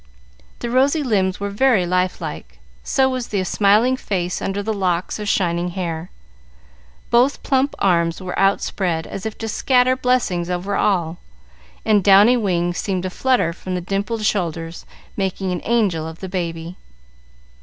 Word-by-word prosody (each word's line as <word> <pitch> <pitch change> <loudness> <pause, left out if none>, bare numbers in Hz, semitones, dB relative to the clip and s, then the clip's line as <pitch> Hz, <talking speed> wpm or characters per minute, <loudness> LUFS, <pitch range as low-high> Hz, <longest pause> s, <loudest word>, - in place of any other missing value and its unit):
The 235 - -3
rosy 280 +5 +3
limbs 190 -7 0
were 200 0 -3
very 215 -3 +3
life 180 +1 0
like, 65 - -7 0.3
so 265 -1 +2
was 255 -2 -3
the 200 -3 -1
smiling 210 +7 +3
face 180 -7 -3
under 200 +1 -2
the 220 +1 -1
locks 185 -1 -1
of 210 -1 -3
shining 175 -2 +1
hair. 170 -2 -3 1.0
Both 250 +4 +3
plump 270 0 +1
arms 170 -3 +1
were 185 -1 -5
outspread 185 -4 0
as 195 +2 -5
if 220 - -7
to 225 - -5
scatter 255 +3 +2
blessings 245 -9 0
over 180 +3 -2
all, 175 -4 0 0.7
and 210 -3 +3
downy 205 +5 +7
wings 175 -6 0
seemed 185 -3 -2
to 185 - -3
flutter 250 -7 +1
from 185 +1 -5
the - - -1
dimpled 200 +4 -2
shoulders, 165 -5 -2 0.3
making 190 -1 -2
an 180 - -3
angel 200 -9 +1
of 160 0 -8
the 190 - -6
baby. 170 -1 -4
195 Hz, 155 wpm, -20 LUFS, 175-220 Hz, 1.0 s, downy